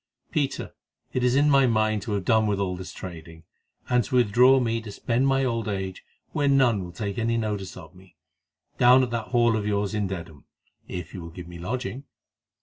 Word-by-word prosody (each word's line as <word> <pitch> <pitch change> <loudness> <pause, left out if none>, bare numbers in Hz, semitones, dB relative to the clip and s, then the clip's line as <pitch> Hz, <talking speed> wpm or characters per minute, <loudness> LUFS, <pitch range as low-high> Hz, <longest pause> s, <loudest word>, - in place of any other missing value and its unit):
Peter, 145 -4 -2 0.4
it 130 - 0
is 125 0 +3
in 145 +2 +4
my 135 -2 +5
mind 110 -2 +1
to 110 - -4
have 100 -3 -2
done 110 -2 +3
with 100 -1 0
all 95 -2 -1
this 95 0 -8
trading, 80 -2 -10 0.4
and 125 -1 +2
to 130 - -4
withdraw 125 +3 +5
me 115 -2 0
to 110 -2 -8
spend 120 +5 0
my 135 0 +2
old 115 -3 -1
age 95 -2 -4 0.3
where 145 - 0
none 130 -8 +3
will 90 - -8
take 100 +4 -4
any 115 0 +1
notice 105 -4 -3
of 80 -4 -12
me, 90 -1 -19 0.6
down 125 +1 +7
at 125 - -2
that 115 -2 -3
Hall 120 -2 +3
of 105 -1 -2
yours 100 0 0
in 105 -2 0
Dedham, 85 -6 -7 0.4
if 90 0 -6
you 95 - -6
will 85 - -8
give 85 +1 -10
me 85 -1 -10
lodging. 125 +7 -4
110 Hz, 210 wpm, -25 LUFS, 95-125 Hz, 0.6 s, down